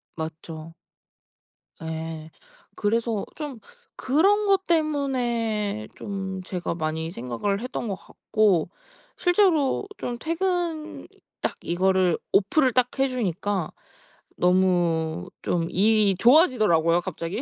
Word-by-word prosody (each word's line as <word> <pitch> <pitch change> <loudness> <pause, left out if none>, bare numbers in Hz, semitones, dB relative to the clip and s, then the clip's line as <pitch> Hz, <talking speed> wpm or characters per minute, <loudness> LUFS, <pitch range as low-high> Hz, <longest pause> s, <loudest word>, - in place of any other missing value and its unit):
맞죠. 160 0 -7 1.1
예. 160 0 -5 0.5
그래서 225 0 0
좀 290 -7 -6 0.4
그런 395 +10 +3
것 390 -1 +3
때문에 240 - 0
좀 190 -2 -5
제가 180 -2 -3
많이 160 0 -3
생각을 125 - -2
했던 250 -2 -4
것 195 - -2
같고 200 -3 0 0.5
실제로 355 -3 +2
좀 240 -1 -4
퇴근 335 0 -2 0.3
딱 - - -1
이거를 185 0 +2
오프를 255 +7 +3
딱 255 +1 +1
해 270 - +4
주니까 205 -6 -2 0.7
너무 175 -2 +2
좀 170 -1 -1
일이 205 0 +3
좋아지더라고요 215 - +4
갑자기. 175 - -4
205 Hz, 205 characters per minute, -25 LUFS, 170-265 Hz, 1.1 s, 해